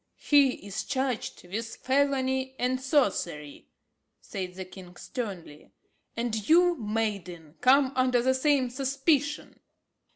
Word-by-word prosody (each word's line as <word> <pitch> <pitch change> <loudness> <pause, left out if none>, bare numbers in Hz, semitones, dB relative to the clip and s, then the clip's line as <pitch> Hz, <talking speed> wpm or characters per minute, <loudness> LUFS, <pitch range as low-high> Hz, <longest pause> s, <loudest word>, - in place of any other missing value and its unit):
"He 280 -7 +3
is 200 +1 -4
charged 260 -8 -3
with 225 +5 -5
felony 265 -1 0
and 255 +1 0
sorcery," 195 - -1 0.5
said 185 -5 -6
the 190 0 -6
king 180 -1 -13
sternly, 185 - -7 0.4
"and 225 -3 -2
you, 350 +2 +5
maiden, 205 - -3
come 265 +1 +5
under 255 -2 +2
the 260 +1 +3
same 260 -2 +2
suspicion." 275 +3 -1
250 Hz, 110 wpm, -28 LUFS, 200-270 Hz, 0.5 s, you